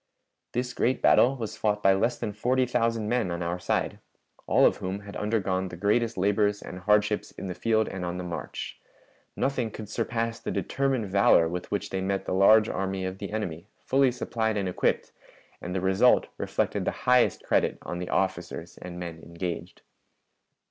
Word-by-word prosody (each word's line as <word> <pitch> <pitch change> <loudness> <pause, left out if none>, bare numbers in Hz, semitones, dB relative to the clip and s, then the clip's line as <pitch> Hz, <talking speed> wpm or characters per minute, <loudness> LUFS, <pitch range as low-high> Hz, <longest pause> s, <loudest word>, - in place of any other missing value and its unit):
This 125 +1 -2
great 130 +1 +1
battle 130 +3 +5
was 110 -4 -5
fought 105 -1 0
by 95 - +6
less 105 +5 +1
than 105 - -4
forty 125 +5 +1
thousand 115 -3 0
men 120 -5 +1
on 85 0 -3
our 85 +1 -2
side, - - -1 0.5
all - - +5
of - - +3
whom 95 +2 -4
had 100 0 -10
undergone 95 -3 0
the 90 - -8
greatest 110 +4 +1
labors 100 +2 +2
and 90 - -8
hardships 105 +2 +2
in - - -7
the 90 - -3
field 110 +2 +1
and 95 -2 -5
on 90 0 -3
the 90 - -4
march. 85 -1 -6 0.6
Nothing 130 -4 0
could 110 0 -8
surpass 115 +1 -2
the - - -5
determined 135 -4 0
valor 95 -4 +5
with 90 +2 -5
which 100 - -3
they 95 - -1
met 95 +1 -1
the - - -2
large 105 +3 +6
army 95 -2 -2
of 95 +1 -5
the 100 - -5
enemy, 95 -5 -4
fully 135 -1 +2
supplied 110 -3 -1
and 100 -2 -1
equipped, 90 - 0 0.5
and 90 +1 -5
the 95 - 0
result 95 +6 +4
reflected - - -1
the - - -4
highest 125 -1 +4
credit - - +1
on 90 - -5
the 90 - -5
officers 95 -1 -2
and 90 -1 -8
men 85 -2 -6
engaged. 85 +1 -6
100 Hz, 185 wpm, -27 LUFS, 95-115 Hz, 0.6 s, by